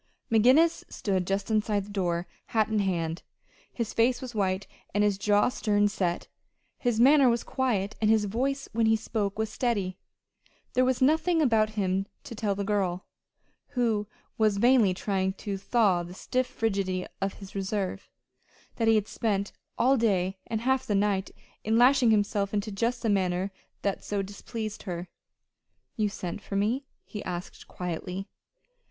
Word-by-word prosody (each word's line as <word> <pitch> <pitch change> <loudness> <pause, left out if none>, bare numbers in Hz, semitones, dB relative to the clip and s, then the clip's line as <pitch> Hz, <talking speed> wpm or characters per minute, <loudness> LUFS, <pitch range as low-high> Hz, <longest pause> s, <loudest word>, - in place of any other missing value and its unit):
McGinnis 255 +9 +5
stood 190 -3 -1
just 195 +2 -1
inside 210 -2 +1
the 205 - -11
door, 175 -3 -1 0.2
hat 220 -1 +1
in 215 -1 +1
hand. 170 -4 -1 0.5
His 230 -3 -3
face 240 +2 +3
was 255 -2 -7
white, 195 -2 0 0.3
and 205 - +3
his 205 -2 +1
jaw 205 +2 +3
stern 205 -4 +2
set. 180 -4 -2 0.5
His 240 -3 0
manner 270 +1 +7
was 235 0 +1
quiet, 220 -6 -1
and 215 - +3
his 220 -1 +4
voice 270 +7 -1
when 225 0 +2
he 220 - +5
spoke 215 -2 -2
was 220 -1 -1
steady. 205 -7 -1 0.7
There 255 - +3
was 260 0 +1
nothing 320 +4 +3
about 225 -7 +3
him 195 0 0 0.2
to 265 - -8
tell 210 -2 -1
the 200 - -2
girl 195 -3 -1 0.7
who 220 -4 +1 0.3
was 215 -2 +3
vainly 230 -4 +4
trying 190 -1 -1
to 200 +1 -5
thaw 195 -2 +2
the 175 +1 -8
stiff 255 +5 -1
frigidity 195 -6 -1 0.2
of 195 0 -1
his 195 -2 -11
reserve 195 -1 -3 0.7
that 225 - +1
he 225 - +6
had 210 -1 +1
spent 200 -3 -1 0.3
all 265 +3 +4
day 190 -4 +1
and 220 -1 -2
half 260 +1 +2
the 205 - +1
night 195 -1 +1 0.3
in 220 +1 +2
lashing 250 0 +5
himself 205 -1 +1
into 210 +1 -1
just 235 +4 -1
this 225 - +2
manner 185 0 0 0.3
that 200 -1 -1
so 205 -1 -2
displeased 210 +2 -6
her. 175 -2 -5 0.9
"You 215 -3 +1
sent 185 0 -5
for 200 - -6
me?" 235 +7 0 0.2
he 210 - -7
asked 180 0 -6
quietly. 180 +2 -5
210 Hz, 165 wpm, -28 LUFS, 195-230 Hz, 0.9 s, manner